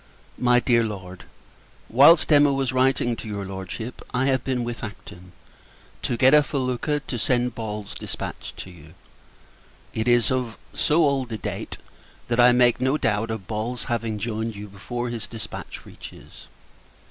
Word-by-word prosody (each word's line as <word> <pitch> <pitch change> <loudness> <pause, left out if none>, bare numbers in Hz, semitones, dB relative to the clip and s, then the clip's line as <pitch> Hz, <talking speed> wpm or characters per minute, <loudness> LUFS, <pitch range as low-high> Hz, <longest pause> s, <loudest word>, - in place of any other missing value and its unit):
MY 125 0 +4
DEAR 120 -2 +3
LORD, 95 -4 -6 0.6
Whilst 145 +8 +6
Emma 145 -1 +6
was 135 -2 0
writing 130 -2 +2
to - - -8
your 100 -2 -4
Lordship, 95 +5 -6
I 130 +2 +2
have 130 -2 +1
been 130 -2 -1
with 120 0 -5
Acton, 90 -4 -9 0.7
to 120 - -1
get 130 +3 +5
a 150 - +8
felucca, 140 +1 -1
to 120 - -4
send 125 +1 +1
Ball's 105 -3 -5
dispatch - - -6
to 95 - -8
you. 80 -1 -15 1.0
It 110 +1 -2
is 120 +1 +4
of 125 -3 -2 0.2
so 155 +2 +3
old 135 -4 0
a 110 - -2
date, 95 - -5 0.5
that 120 0 0
I 120 0 +8
make 120 0 +4
no 130 +3 +2
doubt 115 -3 0
of 110 -4 -4
Ball's 115 +4 -3
having 115 -2 -2
joined 110 +1 -3
you 105 +1 -7
before 120 +5 -5
his 115 -3 -5
dispatch 115 -3 -8
reaches. - - -12
120 Hz, 160 wpm, -24 LUFS, 105-130 Hz, 1.0 s, a